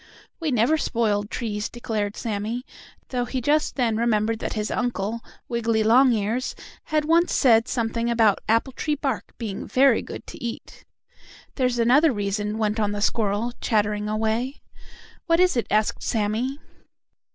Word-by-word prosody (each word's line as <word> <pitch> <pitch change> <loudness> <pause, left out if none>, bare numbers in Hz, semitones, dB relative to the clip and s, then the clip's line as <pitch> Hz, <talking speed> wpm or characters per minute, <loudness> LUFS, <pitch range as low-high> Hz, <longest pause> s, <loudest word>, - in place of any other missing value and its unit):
"We 325 -2 -1
never 255 +5 +2
spoil 210 -6 0
trees," 210 -1 -3
declared 215 -4 -3
Sammie, 225 +3 -3 0.4
though 245 -2 -1
he 260 - -3
just 295 +5 +1
then 235 -5 +1
remembered 225 -1 +1
that - - -3
his 215 -1 -2
Uncle, 230 -2 -2 0.3
Wiggily 230 -2 0
Longears, 235 0 +3 0.3
had 305 -1 0
once 335 +2 +3
said 230 -3 +4
something 230 -1 -1
about 225 -4 +3
apple 230 +4 +2
tree 300 +3 -1
bark 270 -5 -3
being 215 -5 -5
very 260 -2 +4
good - - -8
to - - -10
eat. 235 -1 -7 0.7
"There's 250 -2 0
another 265 +7 +4
reason," 205 0 -2
went 215 0 0
on 205 -1 0
the 205 - -3
squirrel, 220 +2 0
chattering 210 -2 0
away. 220 +5 -1 0.6
"What 330 0 +3
is 365 -4 +4
it?" 235 - 0
asked 215 0 +1
Sammie. 225 +5 -1
230 Hz, 150 wpm, -24 LUFS, 215-255 Hz, 0.7 s, said